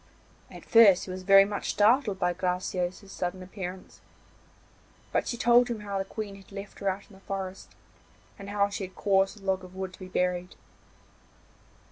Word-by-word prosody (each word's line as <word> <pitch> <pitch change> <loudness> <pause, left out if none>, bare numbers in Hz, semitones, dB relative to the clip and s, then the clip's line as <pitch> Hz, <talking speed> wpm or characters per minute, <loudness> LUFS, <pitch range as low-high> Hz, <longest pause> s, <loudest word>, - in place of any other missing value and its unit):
At - - -12
first 210 -5 +6
he 185 - -7
was 185 0 -6
very 195 +1 +7
much 205 0 -4
startled 215 0 +3
by 180 -1 +1
Graciosa's 180 +1 -2
sudden 185 0 -4
appearance, 185 -1 -8 1.1
but - - 0
she 235 - -2
told 240 +1 +5
him 235 -3 -4
how 200 -1 -3
the 195 - -2
Queen 210 0 -6
had 195 - -17
left 200 0 -9
her 200 - 0
out 195 +1 -5
in 215 - -19
the 190 - -15
forest, 190 -1 -6 0.6
and 200 0 -8
how 200 0 +2
she 200 0 -4
had 185 - -21
caused 195 0 +1
a 195 - -15
log 190 -1 0
of 185 0 -12
wood 190 -1 -5
to - - -14
be 185 - -8
buried. 180 0 -1
195 Hz, 185 wpm, -28 LUFS, 185-205 Hz, 1.1 s, very